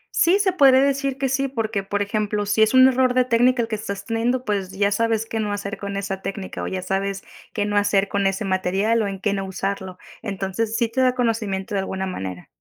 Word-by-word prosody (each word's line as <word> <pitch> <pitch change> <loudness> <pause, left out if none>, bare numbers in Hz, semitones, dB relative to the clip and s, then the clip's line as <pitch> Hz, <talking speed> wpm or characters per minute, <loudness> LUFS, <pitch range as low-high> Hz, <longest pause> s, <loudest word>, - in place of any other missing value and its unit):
Sí, 360 +4 +4
se 400 -2 +2
podría 270 -6 +6
decir 275 -1 0
que 270 - 0
sí, 270 +1 0
porque 225 -6 -2
por 205 +1 -1
ejemplo, 210 0 -1
si 210 +2 +1
es 220 +3 +4
un 260 0 +8
error 255 -1 +2
de 255 -1 +4
técnica 245 +1 +3
el 225 - -4
que 225 - -7
estás 200 -2 -6
teniendo, 240 +3 -1
pues, 200 -3 -1
ya 200 +1 0
sabes 225 +1 +1
qué 225 0 -4
no 210 -1 -1
hacer 205 0 -4
con 200 -1 -4
esa 195 -1 -4
técnica, 195 -1 -5
o - - -3
ya 185 -1 -4
sabes 195 +1 -2 0.3
qué 205 -2 -1
no 205 0 0
hacer 200 -1 +2
con 200 -1 +1
ese 195 +2 -2
material, 195 +4 +1
o 210 - 0
en 195 -1 -5
qué 200 0 0
no 195 -1 -2
usarlo. 190 -1 -4 0.2
Entonces, 205 +2 -2
sí 235 - +2
te 255 +4 -1
da 255 -1 +3
conocimiento 220 -4 -1
de 195 - +1
alguna 190 0 -3
manera. 95 - -6
205 Hz, 240 wpm, -22 LUFS, 195-235 Hz, 0.3 s, un